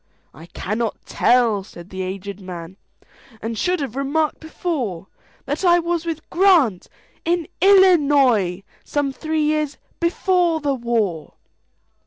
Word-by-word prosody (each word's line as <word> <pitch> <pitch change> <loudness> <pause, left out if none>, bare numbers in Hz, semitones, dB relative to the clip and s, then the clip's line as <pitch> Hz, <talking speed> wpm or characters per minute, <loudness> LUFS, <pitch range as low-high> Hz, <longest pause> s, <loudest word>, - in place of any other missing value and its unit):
"I 160 +3 -13
cannot 215 +6 -3
tell," 230 -4 +2
said 175 -1 -13
the 190 0 -5
aged 195 +1 -5
man,"And 190 +5 -10
should 360 +9 0
have 260 -4 -4
remarked 290 +3 0
before, 285 - -4 0.4
That 290 +7 -3
I 350 -1 +5
was 340 -1 -1
with 320 -2 -4
Grant,—in 340 - +1
Illinois,—Some 285 - +3
three 315 +1 -1
years 300 -1 0 0.2
before 345 -1 +1
the 290 -2 0
war." 225 - -2
275 Hz, 110 wpm, -21 LUFS, 200-330 Hz, 0.4 s, I